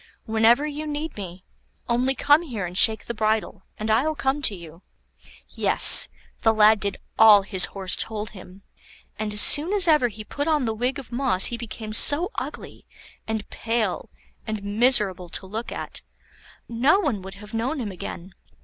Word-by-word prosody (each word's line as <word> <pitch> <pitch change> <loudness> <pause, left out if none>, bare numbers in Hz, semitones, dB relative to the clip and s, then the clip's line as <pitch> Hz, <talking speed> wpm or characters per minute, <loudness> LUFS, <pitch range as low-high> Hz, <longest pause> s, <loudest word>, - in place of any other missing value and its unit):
Whenever 225 +5 +2
you 300 +1 -6
need 300 +1 -6
me, 185 -2 -10 0.4
only 250 +3 -1
come 290 +4 +3
here 235 - -6
and 175 +1 -9
shake 220 +2 +4
the 235 - -6
bridle, 215 -3 -2 0.2
and 215 +1 -4
I'll 285 +8 0
come 270 +1 -2
to 215 -7 +1
you." 170 -1 -14 0.7
Yes! - - +6 0.3
the 225 - +3
lad 215 0 +4
did 200 0 -3 0.2
all 215 -2 +7
his 190 -2 0
Horse 190 -2 -4
told 215 0 -6
him, 190 -1 -15 0.6
and 215 -1 -4
as 210 0 +3
soon 310 +6 +7
as 390 -4 0
ever 300 -6 +3
he 215 -1 -10
put 285 +7 -6
on 305 -5 0
the 225 - -2
wig 245 +4 -3
of 265 -3 -11
moss 240 -7 +1
he - - -1
became 225 -2 -9
so 305 - +5
ugly, - - -8 0.4
and 220 -1 -5
pale, 225 -4 -3 0.4
and 215 -2 -5
miserable 205 -4 0
to 180 - -7
look 220 +5 -7
at, - - -6 0.7
no 260 +11 +1
one 270 - -3
would 190 +1 -11
have 210 +2 -14
known 250 +7 -3
him 215 -5 -5
again. 180 0 -9
220 Hz, 175 wpm, -22 LUFS, 205-265 Hz, 0.7 s, all